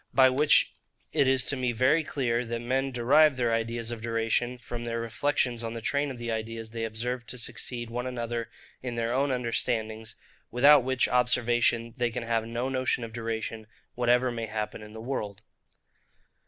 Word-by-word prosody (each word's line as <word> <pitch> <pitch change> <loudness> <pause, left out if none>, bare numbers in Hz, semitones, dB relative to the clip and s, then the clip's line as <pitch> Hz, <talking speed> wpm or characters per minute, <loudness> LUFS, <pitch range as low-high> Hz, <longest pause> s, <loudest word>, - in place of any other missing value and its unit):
By 130 -1 +7
which 145 +3 +4 0.4
it 140 - +3
is 130 -1 +3
to - - +1
me 125 -2 -1
very 130 +8 +3
clear, 125 -5 -1
that 115 0 -3
men 130 +3 -1
derive 130 +4 +4
their 120 -2 +1
ideas 115 0 -1
of 115 -2 -5
duration 115 +2 0
from 120 0 -6
their 115 0 -2
reflections 120 +1 0
on 115 0 -4
the - - -4
train 140 +5 0
of 130 - -6
the 120 -1 -4
ideas 110 0 -4
they 115 0 -3
observe 120 +3 -4
to 125 - -1
succeed 120 0 -4
one 125 +2 -3
another 120 -2 -3 0.3
in 125 -2 -4
their 115 0 -1
own 140 +2 +1
understandings; 110 -3 -1 0.3
without 140 +3 +6
which 130 0 +1
observation 120 -1 +2
they 120 -1 +1
can 120 +1 -4
have 115 -1 -1
no 120 +2 -2
notion 130 -2 0
of 115 -1 -7
duration, 115 -1 -4 0.3
whatever 125 +1 +2
may 115 -1 -4
happen 110 0 -4
in 105 0 -11
the 110 - -8
world. 105 -5 -4
120 Hz, 180 wpm, -28 LUFS, 115-125 Hz, 0.4 s, By